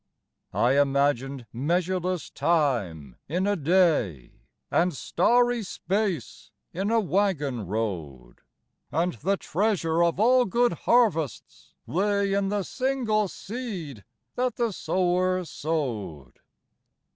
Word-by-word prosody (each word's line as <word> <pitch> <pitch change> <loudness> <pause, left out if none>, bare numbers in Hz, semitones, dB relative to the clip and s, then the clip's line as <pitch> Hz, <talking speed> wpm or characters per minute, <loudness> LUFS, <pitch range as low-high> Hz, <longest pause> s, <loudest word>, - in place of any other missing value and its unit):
I 130 +4 +3
imagined 140 -2 0
measureless 175 +5 -1
time 110 - 0
in 180 +5 0
a 205 0 +2
day, 155 - +1 0.2
And 175 -2 +2
starry 240 - +2
space 185 - -3 0.2
in 195 +4 -2
a 230 0 +3
waggon 165 - 0
road, 90 - -4 0.5
And 170 +4 0
the 190 - -1
treasure 170 -4 0
of 170 +1 +1
all 250 +3 +5
good 240 +4 +2
harvests 200 - 0
lay 200 +2 0
In 200 -1 +1
the 205 -1 -1
single 240 -4 0
seed 185 - -7 0.3
that 250 -2 -1
the 235 -2 0
sower 185 0 0
sowed. 115 - -4
175 Hz, 105 wpm, -26 LUFS, 135-205 Hz, 0.5 s, all